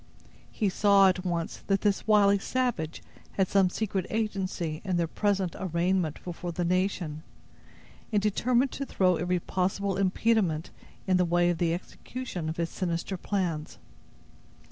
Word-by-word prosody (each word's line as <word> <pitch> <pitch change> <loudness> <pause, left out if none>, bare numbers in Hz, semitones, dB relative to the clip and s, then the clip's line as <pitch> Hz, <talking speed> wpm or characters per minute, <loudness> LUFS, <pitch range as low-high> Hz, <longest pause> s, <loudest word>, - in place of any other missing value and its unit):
He 210 - 0
saw, 195 0 +5
at 185 0 -1
once, 170 -3 -2
that 195 -1 +2
this 205 0 0
wily 200 -2 +5
savage 225 -10 -2 0.3
had 190 -2 +1
some 195 -1 +3
secret 195 -2 -2
agency 190 -7 -2
in 185 -3 0
their 170 - +2
present 195 0 0
arraignment 175 -2 0
before 175 0 -5
the 175 +1 -2
nation, 180 -4 -1 0.9
and 210 - +3
determined 240 +5 +1
to 275 - -4
throw 180 -2 +2
every 180 +2 0
possible 190 +2 -1
impediment 190 -4 +1 0.3
in 185 -1 +3
the 180 - +3
way 175 0 +3
of 170 - -4
the 170 -2 +2
execution 180 -2 -6
of 160 - -4
his 170 -1 -1
sinister 175 +1 -2
plans. 175 -5 -2
185 Hz, 145 wpm, -28 LUFS, 170-200 Hz, 0.9 s, saw